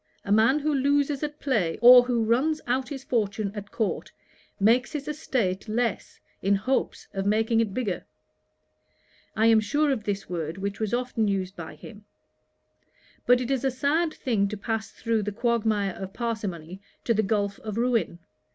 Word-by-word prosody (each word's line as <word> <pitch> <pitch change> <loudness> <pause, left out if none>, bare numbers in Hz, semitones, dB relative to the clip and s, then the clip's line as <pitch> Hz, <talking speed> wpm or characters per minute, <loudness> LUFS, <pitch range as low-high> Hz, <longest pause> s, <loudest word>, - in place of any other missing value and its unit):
A 200 - -3
man 225 +7 +5
who 300 0 0
loses 285 +1 +1
at 295 -1 -4
play, 210 - 0
or 245 +2 +10
who 245 -2 0
runs 265 +8 +1
out 255 +1 -1
his 270 -3 -6
fortune 210 -4 -1
at 205 -1 -7
court, 220 -3 -2 0.5
makes 235 +7 +3
his 290 -1 -4
estate 240 -11 -2
less, 230 -1 -2 0.2
in 200 +1 +3
hopes 255 +7 -1
of 195 0 -2
making 220 +2 +2
it 225 -3 +1
bigger: 205 -5 -3 1.3
(I 220 - +2
am 225 -1 +6
sure 290 +7 +1
of 240 -6 -2
this 200 -1 -3
word, 165 -2 -4
which 200 +1 -4
was 215 -2 -1
often 245 -3 0
used 190 -1 -2
by 165 -2 -8
him:) 210 -2 -13 1.2
but 245 0 +5
it 250 +1 -3
is 270 -2 0
a 270 - +2
sad 295 +6 0
thing 220 -9 0
to 210 +1 -5
pass 220 0 -3
through 230 -2 -1
the 210 0 -3
quagmire 215 -3 0
of 190 +1 -8
parsimony, 195 -7 -4 0.2
to 230 - +2
the 220 - +2
gulph 200 -1 -1
of 215 -1 -6
ruin. 235 -7 0
225 Hz, 175 wpm, -26 LUFS, 200-255 Hz, 1.3 s, or